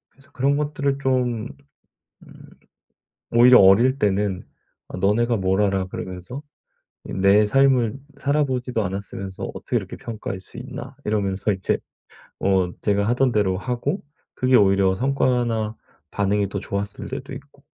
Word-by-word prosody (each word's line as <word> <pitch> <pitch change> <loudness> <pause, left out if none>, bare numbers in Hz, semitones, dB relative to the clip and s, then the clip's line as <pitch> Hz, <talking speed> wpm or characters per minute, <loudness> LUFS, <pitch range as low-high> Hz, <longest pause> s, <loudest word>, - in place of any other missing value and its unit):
그래서 140 +1 -24
그런 140 +2 +1
것들을 145 -2 -1
좀 125 -3 0 0.8
음 - - -16 0.9
오히려 125 +2 +7
어릴 115 +8 +5
때는 100 -2 0 0.4
아 - - -7
'너네가 110 +5 +2
뭘 95 +1 +1
알아?' 95 -2 0
그러면서 95 +10 -7 0.6
이 - - -7
'내 100 +2 +4
삶을 130 0 +3 0.2
살아 145 +2 +1
보지도 125 -3 -2
않았으면서 95 0 -6
어떻게 - - -5
이렇게 - - -6
평가할 110 -4 -6
수 95 - -14
있나.' - - -8
이러면서 100 -1 0
이제 95 -1 -1 0.6
어 95 -2 +2
제가 100 0 +1
하던 125 +1 +2
대로 95 -4 +1
하고 125 - -2 0.3
그게 130 0 +3
오히려 95 -1 +4
성과나 120 -3 0 0.4
반응이 100 0 0
더 100 - -3
좋았을 100 +1 -5
때도 135 +1 -6
있고. 140 +1 -14
110 Hz, 295 characters per minute, -22 LUFS, 95-130 Hz, 0.9 s, 오히려